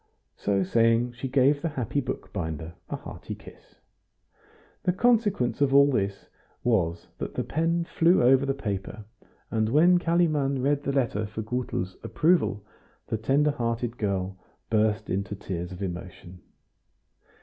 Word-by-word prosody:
So 100 -1 0
saying 115 +4 +3
she 120 +3 -5
gave 140 +2 +3
the 165 - -1
happy 140 0 -2
bookbinder 80 - -5 0.2
a - - -2
hearty - - -8
kiss. - - -16 1.1
The 180 - +1
consequence 205 - +2
of 140 -1 +3
all 140 0 +7
this 100 -5 -2 0.4
was 85 -8 0
that - - -5
the - - -1
pen 165 +2 0
flew 170 -2 +3
over 130 +2 +5
the 135 0 0
paper, 105 -3 -5 0.5
and 110 -1 +1
when 170 +7 +5
Kalimann 155 -6 +1
read 145 +1 +2
the 140 - -2
letter 115 -6 0
for 110 +1 -5
Gutel's 110 -6 -3
approval 155 - +1 0.4
the 110 - -2
tender 145 +6 +2
hearted 120 -2 -2
girl 95 -2 -2 0.3
burst 110 0 +2
into 100 +2 -2
tears 90 -2 -5
of 90 +2 -6
emotion. 90 0 -7
120 Hz, 140 wpm, -27 LUFS, 100-145 Hz, 1.1 s, all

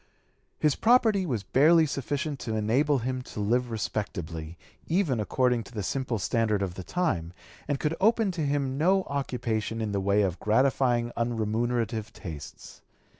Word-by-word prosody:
His 150 -2 +2
property 220 -5 +3
was 120 -8 -2
barely 160 +7 +5
sufficient 140 0 -3
to 110 - -3
enable 130 +7 +2
him 130 +1 -2
to 125 - -9
live 120 +4 +1
respectably, 85 -7 -4 0.3
even 165 - +1
according 125 +2 +1
to - - -13
the 105 -3 -3
simple 130 +1 -2
standard 105 0 0
of 95 -3 -3
the 95 - -7
time, 90 - -1 0.3
and 145 -2 -1
could 155 +1 0
open 220 -1 +3
to 170 -2 -4
him 140 -2 -1
no 190 +4 +3
occupation 115 -6 -2
in 110 -2 -2
the 100 -1 -1
way 100 +2 +3
of 90 -3 -1
gratifying 120 +1 +2
unremunerative 115 -1 -1
tastes. 80 -6 -9
120 Hz, 155 wpm, -27 LUFS, 105-145 Hz, 0.3 s, barely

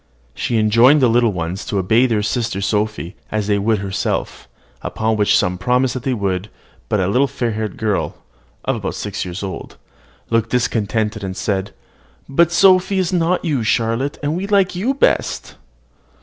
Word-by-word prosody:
She 120 - -1
enjoined 115 +7 +5
to - - +5
the 120 - +3
little 120 -1 +3
ones 90 +2 -4
to 110 -5 -1
obey 110 +7 +3
their 110 -4 0
sister 115 -2 -1
Sophy 105 -5 -1 0.2
as 110 -1 -1
they 100 0 +1
would 110 +2 +1
herself, 95 -1 -3 0.3
upon 110 0 -1
which 105 -1 +3
some 90 0 0
promised 125 +4 +1
that 130 - -4
they 130 +1 -1
would; 100 -1 -2 0.4
but 105 - +1
a 90 - +1
little 125 +8 +2
fair 120 -3 -2
haired 110 0 -4
girl, 105 -3 -1 0.5
about - - -2
six - - -4
years 90 +2 -6
old, 95 -3 -7 0.5
looked 115 0 +1
discontented, 110 -3 -1
and 95 -1 -5
said, 95 -2 -2 0.6
"But 170 +5 +3
Sophy 185 +2 +4
is 185 0 0
not 180 +1 +1
you, 145 -7 0
Charlotte; 115 +5 0
and 145 +2 0
we 190 +3 -3
like 200 -3 +2
you 235 +10 0
best." 275 - 0
115 Hz, 175 wpm, -19 LUFS, 100-135 Hz, 0.6 s, enjoined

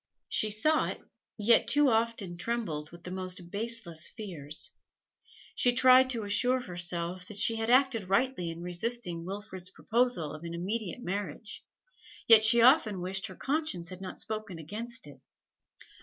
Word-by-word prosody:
She 215 - +2
saw 305 +10 +2
it, - - -5 0.4
yet 225 +2 +4
too 290 0 +4
often 225 -6 0
trembled 175 -7 -3
with 170 0 -14
the 180 - -7
most 185 -1 -5
baseless 205 -7 -5
fears. 160 - -5 0.8
She 245 - +2
tried 255 +1 +6
to 235 -4 -2
assure 245 +6 +2
herself 175 -4 -4
that 210 - -8
she 225 +2 +1
had 225 +1 -2
acted 250 -6 +3
rightly 195 -4 +1
in 165 +1 -7
resisting 180 -1 -1
Wilfrid's 190 -1 -6
proposal 230 -8 0
of 155 - -9
an 170 0 -5
immediate 205 +5 -3
marriage, 205 +2 -5 0.6
yet 225 -2 +8
she 230 +2 +7
often 240 - +5
wished 190 +2 -3
her 185 - -10
conscience 280 - -2
had 185 0 -9
not 190 - -7
spoken 215 -4 -5
against 225 +9 -6
it. 140 -3 -14
205 Hz, 155 wpm, -30 LUFS, 175-235 Hz, 0.8 s, yet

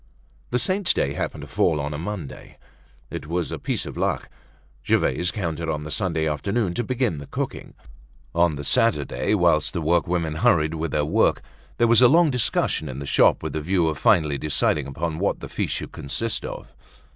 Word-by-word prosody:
The 125 - +1
saint's 190 +7 +1
day 70 - 0
happened - - -4
to - - -8
fall 75 - +1
on 75 +1 -3
a 75 - -4
Monday. 90 -4 -7 0.5
It - - -6
was 85 +1 -2
a - - -4
piece - - -2
of - - -7
luck. - - -1 0.5
Gervaise 90 +6 +1
counted 85 -3 -3
on 75 -1 -2
the 75 - -7
Sunday 80 -6 0
afternoon 100 +6 -1
to 120 - -1
begin 125 - -1
the 70 - -9
cooking. - - -5 0.6
On 85 -2 +3
the 70 - -6
Saturday, 105 +2 +1
whilst 80 -5 +2
the 85 - -1
workwomen 85 -1 +1
hurried 80 -1 +3
with 80 0 -2
their 75 +1 0
work, 75 - +2 0.3
there 120 - +4
was 115 0 +5
a 125 - +9
long 165 +3 +5
discussion 125 - 0
in 65 - -6
the 70 - -5
shop - - +3
with - - -4
the 80 - -2
view 85 +1 +1
of 75 - -4
finally 75 -4 +3
deciding 75 -1 0
upon 80 +3 -3
what 100 - 0
the - - -7
feast - - -2
should - - -5
consist 110 +11 -2
of. - - -8
85 Hz, 195 wpm, -24 LUFS, 75-100 Hz, 0.6 s, a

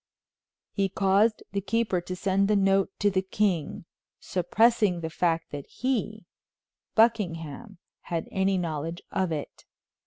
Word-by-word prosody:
He 195 -2 0
caused 200 +4 +2
the 200 0 -1
keeper 200 -2 0
to 185 +1 -5
send 195 +1 +1
the 210 - +3
note 195 -1 +3
to 205 0 +2
the 190 0 +1
king, 190 -5 -1 0.3
suppressing 195 0 +2
the 160 0 -4
fact 165 -1 0
that 145 -1 -6
he, 220 -6 -2 0.7
Buckingham, 205 -3 +1 0.3
had 165 -1 -2
any 190 0 +1
knowledge 165 0 -3
of 185 -3 0
it. 150 -3 -5
190 Hz, 130 wpm, -27 LUFS, 170-210 Hz, 0.7 s, the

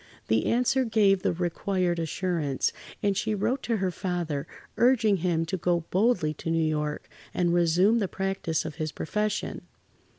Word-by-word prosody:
The 110 0 +2
answer 250 +2 +2
gave 210 -5 +3
the - - +1
required 175 0 -1
assurance, 165 -4 -1 0.3
and 200 -1 +2
she 215 +2 0
wrote 250 +7 0
to 230 -2 -1
her 190 -2 0
father, 175 -6 -3 0.3
urging 230 -5 +4
him 165 -2 0
to 185 +3 -2
go 175 0 +1
boldly 185 -6 +2
to - - -3
New 165 -1 +2
York 150 -1 -2 0.3
and 175 -1 +2
resume 175 +6 +4
the 200 - 0
practice 190 -5 -2
of 155 -1 -6
his 155 -2 -2
profession. 210 +7 -2
180 Hz, 160 wpm, -27 LUFS, 165-210 Hz, 0.3 s, urging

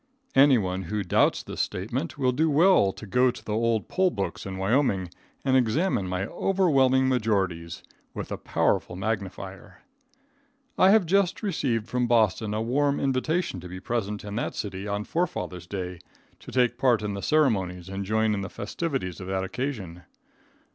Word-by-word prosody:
Anyone 105 -10 +4
who 105 +3 -2
doubts 90 - +2
this - - -4
statement, 125 - -3
will 130 -3 +2
do 155 +6 +1
well 150 - +5
to 105 - -10
go 125 +6 +3
to - - -7
the 105 - -3
old 115 0 +1
poll 185 0 +2
books 100 - -4
in 95 -1 -5
Wyoming 95 -3 +1 0.3
and 130 -1 +3
examine 130 - +1
my 90 +1 -2
overwhelming 135 - +2
majorities 95 -9 -1 0.3
with - - -5
a - - -2
powerful 90 - 0
magnifier. 95 -1 -5 0.9
I 185 - +5
have 210 -2 +5
just 195 +4 +1
received 125 - -1
from 125 +1 0
Boston 110 -2 +2
a 110 - -1
warm 140 +4 +1
invitation 135 - 0
to 90 +1 -9
be 90 +1 -7
present 105 -1 -3
in 100 0 -5
that - - -2
city 100 -1 -5
on 100 0 -2
Forefathers' 130 - -3
day, 90 -2 -5 0.4
to - - -11
take 125 -1 +1
part 125 -5 +3
in 105 -1 -2
the 100 - -5
ceremonies 95 - +1
and 95 +1 -4
join 110 +2 +1
in 100 - -2
the 100 - -5
festivities 120 - -4
of 90 - -7
that 95 0 -1
occasion. 95 -6 -4
110 Hz, 170 wpm, -26 LUFS, 95-135 Hz, 0.9 s, well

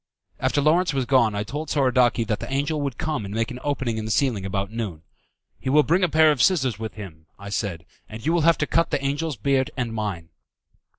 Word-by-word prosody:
After 145 - +1
Lawrence 160 +2 +2
was 135 -2 0
gone 120 -5 +3
I 100 - -1
told 145 +7 -5
Soradaci 125 -4 +2
that 105 -1 -1
the - - -7
angel 145 +3 -1
would 140 -4 -3
come 155 -7 -2
and 100 - -6
make 115 +2 -1
an 125 - -7
opening 130 -6 -1
in 110 - -4
the - - -4
ceiling 110 -5 0
about 95 +1 -3
noon. 105 -9 -5 0.6
"He 130 - -3
will 150 +2 +5
bring 170 +7 +2
a 180 - +3
pair 155 0 +5
of 140 -5 0
scissors 130 - +2
with 110 -1 -5
him," 85 -6 -10
I 100 0 -9
said, 95 -5 -3 0.2
"and 110 +1 -9
you 160 - +2
will 175 - +2
have 165 0 +4
to 150 - 0
cut 165 +3 +1
the - - 0
angel's 145 +1 -2
beard 135 +4 +1
and 120 -3 -2
mine." 100 -7 -4
130 Hz, 235 wpm, -24 LUFS, 105-145 Hz, 0.6 s, will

